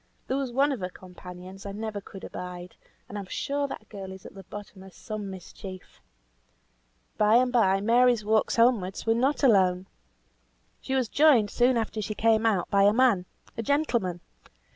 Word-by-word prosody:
There 260 - -1
was 270 -3 -2
one 275 +4 +2
of 265 - -3
her 180 -1 -3
companions 180 +1 -11
I 200 - -6
never 215 -1 -5
could 195 0 -12
abide, 180 0 -8 0.3
and 205 - -6
I'm 195 - -7
sure 285 +7 -2
that - - -8
girl 195 -3 -8
is 190 0 -11
at - - -10
the 195 - -10
bottom 205 -1 -10
of 190 -1 -14
some 215 -3 -6
mischief. 185 0 -10 1.2
By 210 +1 +5
and 250 +1 +3
bye, 195 -5 +3
Mary's 235 0 +3
walks 220 0 +2
homewards 230 -6 +2
were 225 - +3
not 265 +6 0
alone. 190 -7 +4 1.0
She 265 - -3
was 260 -3 +1
joined 270 -9 +4
soon 245 0 +3
after 220 -1 -2
she 215 +1 -4
came 225 0 +3
out, 195 -6 +1
by 200 - +4
a 205 - +5
man; 230 -7 +3 0.3
a 230 - -3
gentleman. 235 - 0
215 Hz, 180 wpm, -27 LUFS, 190-245 Hz, 1.2 s, By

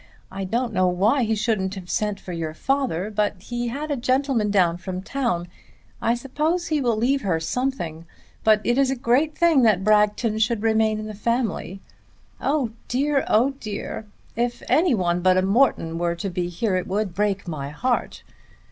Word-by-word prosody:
I 195 0 -4
don't 230 +4 -1
know 185 -2 +3
why 200 +9 +2
he 220 0 +1
shouldn't 205 -3 -1
have 185 -2 -8
sent 210 +1 -1
for 180 - -7
your 160 -2 -4
father, 245 - -1
but 210 0 0
he 240 +5 -4
had 290 +6 -4
a - - +1
gentleman 255 -3 +1
down 180 -4 +3
from 185 0 -6
town. 235 -9 -1 0.5
I 230 - +2
suppose 305 +8 -1
he 305 -2 +1
will 235 -4 +1
leave 265 +5 +1
her 180 -6 0
something; 170 -5 -3 0.4
but 215 -1 +4
it 240 +3 +1
is 275 -1 +3
a 270 - 0
great 260 +5 +1
thing 335 -5 +4
that 210 -5 +3
Bragton 210 +1 +2
should 220 -1 +1
remain 220 -1 +2
in 215 - -5
the 215 - -6
family. 215 -3 -2 0.6
Oh 275 -5 0 0.2
dear, 275 +2 +1
oh 245 +6 +3
dear, 215 0 -5 0.3
if 240 +1 -2
any 325 -5 +3
one 175 -3 0
but 185 0 +4
a 185 - +3
Morton 195 -6 +2
were 170 0 0
to 195 +2 -4
be 175 0 -2
here 190 +3 -1
it 180 - -3
would 200 -1 -1
break 200 0 -1
my 145 -4 -4
heart. 245 - -2
215 Hz, 185 wpm, -23 LUFS, 185-250 Hz, 0.6 s, but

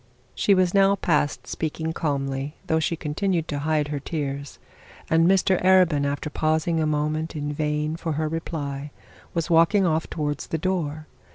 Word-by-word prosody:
She 200 - +3
was 185 -1 +2
now 195 0 +5
past 150 -6 0
speaking 160 0 -3
calmly, 140 -2 -2
though 160 -3 +1
she 160 +1 0
still - - -15
continued 165 +2 -1
to 145 - -2
hide 150 0 0
her 145 -1 -2
tears, 140 -2 -4 0.5
and 165 +1 +5
Mr 190 -1 +3
Arabin, 180 -6 +4
after 145 +2 -2
pausing 160 +2 +1
a 155 - +1
moment 155 +2 -1
in 145 -1 -3
vain 150 +1 -1
for 165 -1 -3
her 155 +1 -1
reply, 150 -3 -4 0.5
was 170 +1 -1
walking 170 +4 +5
off 160 -1 0
towards 145 -2 -3
the 160 - -2
door. 155 -3 -2
155 Hz, 170 wpm, -24 LUFS, 150-170 Hz, 0.5 s, now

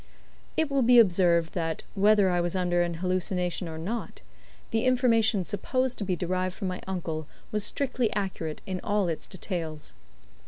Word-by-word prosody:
It 315 -3 +1
will 275 -1 +2
be 245 0 +6
observed 175 -6 +4
that, 165 -2 -2
whether 205 -1 +4
I 175 0 +2
was 175 +1 -1
under 175 -1 +1
an 175 -1 -1
hallucination 180 0 -1
or 160 - -6
not, 205 +7 -5 0.5
the 225 +2 +1
information 230 -6 +3
supposed 255 +6 -1
to - - -1
be 185 -2 0
derived 185 +1 -1
from 195 -3 -3
my 180 - -5
uncle 160 -5 -3 0.2
was 210 -1 +1
strictly 250 0 0
accurate 185 -6 -3
in 185 -1 -3
all 205 -2 +1
its 165 -2 -3
details. 165 - -5
185 Hz, 165 wpm, -27 LUFS, 175-215 Hz, 0.5 s, be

